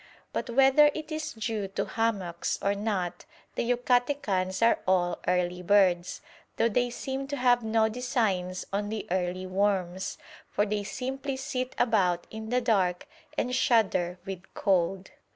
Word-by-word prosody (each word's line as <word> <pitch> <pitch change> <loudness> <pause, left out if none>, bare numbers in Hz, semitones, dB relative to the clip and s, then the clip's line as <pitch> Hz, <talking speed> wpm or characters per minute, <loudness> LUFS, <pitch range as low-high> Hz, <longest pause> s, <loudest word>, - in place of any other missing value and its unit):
But - - -3
whether 270 +4 +6
it 310 0 -6
is 310 0 -3
due 220 -2 -3
to 195 - -3
hammocks 200 -7 -1
or 200 - +1
not 195 -4 -2 0.3
the - - -2
Yucatecans 245 -6 +1
are 230 - +4
all 175 -2 +2
early 180 0 +1
birds, 180 -2 +3 0.4
though 230 - +3
they 245 +2 +1
seem 265 +2 -4
to 285 0 -3
have 245 -1 +4
no 220 0 +2
designs 215 -6 -1
on 205 +1 -1
the 220 0 -4
early 185 0 -1
worms; 190 -1 -1 0.3
for 205 - +1
they 210 0 -2
simply 265 +5 -4
sit 260 -2 -3
about 185 -7 +2
in 220 0 -7
the 250 +1 +2
dark 190 -7 +1 0.3
and 250 - 0
shudder 195 -8 +2
with 190 -1 -7
cold. 190 -1 +1
210 Hz, 150 wpm, -28 LUFS, 185-245 Hz, 0.4 s, whether